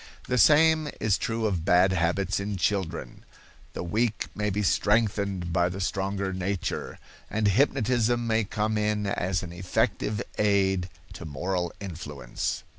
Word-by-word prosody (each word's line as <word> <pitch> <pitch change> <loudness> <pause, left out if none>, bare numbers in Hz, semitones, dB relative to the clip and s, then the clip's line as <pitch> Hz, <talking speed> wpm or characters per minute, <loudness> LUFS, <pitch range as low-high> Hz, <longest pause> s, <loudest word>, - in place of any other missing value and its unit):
The 125 -1 +1
same 155 +4 +5
is 105 -3 +2
true 115 -1 -1
of 95 -6 0
bad 90 +2 +4
habits 90 +3 0
in 100 0 -3
children. 90 -3 -2 0.5
The - - -4
weak 110 +5 -1
may 105 0 -1
be 105 +1 -1
strengthened 100 -4 +1
by 90 +1 +2
the 95 +2 -6
stronger 95 0 -2
nature, 95 +1 -3 0.3
and 110 -1 +1
hypnotism 120 +1 +2
may 110 -1 +1
come 105 +1 -1
in 105 0 0
as 95 -2 -1
an 85 -2 -7
effective 95 +3 -1 0.2
aid 95 -3 +2 0.2
to 85 - -8
moral 90 +4 -2
influence. 75 -9 -4
100 Hz, 140 wpm, -27 LUFS, 90-110 Hz, 0.5 s, same